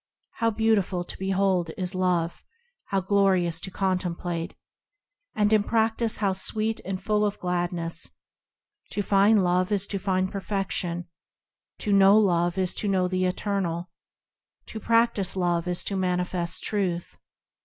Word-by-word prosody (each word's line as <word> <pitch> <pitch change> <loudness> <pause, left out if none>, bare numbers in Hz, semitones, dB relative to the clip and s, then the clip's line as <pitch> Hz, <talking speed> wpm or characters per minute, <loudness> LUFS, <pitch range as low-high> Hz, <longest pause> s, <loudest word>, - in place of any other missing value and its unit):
How 230 - +2
beautiful 210 -5 +1
to - - -9
behold 190 -2 +1
is 185 0 -3
Love! 180 -2 0 0.4
How 195 -1 0
glorious 185 -4 +2
to 190 - -5
contemplate! 180 -2 -2 0.8
And 210 0 +2
in 215 - +5
practice 225 +1 +1
how 200 -3 +1
sweet 215 +3 0
and 190 -1 -4
full 210 +2 +1
of 205 -1 0
gladness! 175 -2 -2 0.8
To 205 - -1
find 200 +1 +4
Love 180 +2 +1
is 200 -1 +1
to 200 -1 -3
find 185 -1 0
Perfection; 190 -3 -2 0.7
To 205 - 0
know 195 +1 +7
Love 175 -3 +2
is 185 -2 0
to 210 - -2
know 185 -2 +2
the 185 0 0
Eternal; 180 -2 -2 0.8
To 220 - -6
practise 230 -4 +2
Love 175 -2 0
is 180 0 -1
to 200 - -3
manifest 180 -1 -1
Truth. 185 -5 -2
190 Hz, 140 wpm, -26 LUFS, 180-205 Hz, 0.8 s, know